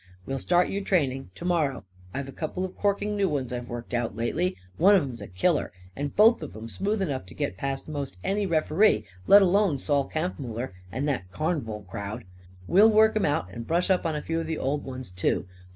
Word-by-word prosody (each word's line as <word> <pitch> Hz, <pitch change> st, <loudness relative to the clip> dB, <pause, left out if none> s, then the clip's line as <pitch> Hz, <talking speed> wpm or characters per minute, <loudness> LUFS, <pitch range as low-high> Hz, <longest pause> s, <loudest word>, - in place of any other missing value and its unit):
We'll 135 Hz, 0 st, -3 dB
start 175 Hz, +4 st, +2 dB
you 200 Hz, -, -2 dB
training, 135 Hz, -, 0 dB
to 170 Hz, -, -8 dB
morrow. 155 Hz, -7 st, +1 dB, 0.3 s
I've 140 Hz, +4 st, -4 dB
a -, -, -7 dB
couple 170 Hz, +6 st, -3 dB
of 185 Hz, -, -8 dB
corking 205 Hz, +1 st, 0 dB
new 200 Hz, -2 st, +2 dB
ones 135 Hz, -5 st, -2 dB
I've 120 Hz, -1 st, -5 dB
worked 120 Hz, 0 st, -6 dB
out 120 Hz, -4 st, -1 dB
lately. 95 Hz, -5 st, -1 dB, 0.2 s
One 200 Hz, +5 st, +6 dB
of 185 Hz, -, +4 dB
'em's 125 Hz, -5 st, -6 dB
a 100 Hz, -, -7 dB
killer. 145 Hz, -, +1 dB, 0.2 s
And 145 Hz, 0 st, -4 dB
both 225 Hz, 0 st, +6 dB
of 155 Hz, -, -7 dB
'em 110 Hz, +1 st, -7 dB
smooth 200 Hz, -, -1 dB
enough 135 Hz, -, -3 dB
to 85 Hz, -, -13 dB
get 90 Hz, -, -2 dB
past 135 Hz, +6 st, -3 dB
most 140 Hz, -9 st, -5 dB
any 200 Hz, 0 st, 0 dB
ref'ree, 160 Hz, -, +3 dB, 0.2 s
let 200 Hz, 0 st, +9 dB
alone 190 Hz, -4 st, +3 dB
Sol 140 Hz, 0 st, 0 dB
Kampfmuller 130 Hz, -, -3 dB, 0.2 s
and 135 Hz, +7 st, -2 dB
that 125 Hz, -11 st, -2 dB
carn'val 125 Hz, -, -2 dB
crowd. 100 Hz, +2 st, -5 dB, 0.4 s
We'll 205 Hz, -, +6 dB
work 220 Hz, 0 st, +5 dB
'em 215 Hz, -, +2 dB
out 95 Hz, -11 st, -1 dB
and 115 Hz, +2 st, -7 dB
brush 175 Hz, +4 st, +1 dB
up 185 Hz, -, +2 dB
on 160 Hz, -, -1 dB
a 150 Hz, -, -3 dB
few 165 Hz, 0 st, -1 dB
of 165 Hz, -, -4 dB
the 160 Hz, -1 st, -2 dB
old 140 Hz, +2 st, -1 dB
ones 130 Hz, -5 st, -7 dB
too. 90 Hz, +2 st, 0 dB
145 Hz, 215 wpm, -27 LUFS, 120-180 Hz, 0.4 s, let